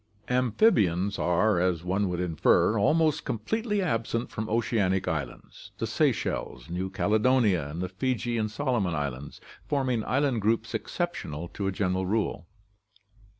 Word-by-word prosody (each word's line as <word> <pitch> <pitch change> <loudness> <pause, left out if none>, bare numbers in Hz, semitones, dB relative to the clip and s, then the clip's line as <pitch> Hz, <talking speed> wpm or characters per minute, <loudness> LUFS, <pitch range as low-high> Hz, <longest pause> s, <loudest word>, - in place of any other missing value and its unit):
Amphibia 125 - +3 0.2
are, 90 +3 +2
as 90 -2 0
one 95 +2 0
would 90 -1 -2
infer, 90 +5 +3
almost 155 +7 +2
completely 205 - -1
absent 115 -6 -1
from 110 0 -4
oceanic 105 -5 +1
islands, 70 -5 -5
the - - -2
Seychelles, 85 - -1
New 95 +2 -2
Caledonia, 105 - +2
and 80 +5 -4
the 90 - -3
Fiji 120 +4 -1
and 110 -1 0
Solomon 110 - -1
islands 70 -1 -4 0.3
forming 130 -6 0
island 135 -3 +1
groups 110 +2 0
exceptional 110 - -3
to 100 - -4
a - - +1
general 95 -1 -1
rule. 105 -4 -1
105 Hz, 135 wpm, -27 LUFS, 90-125 Hz, 0.3 s, Amphibia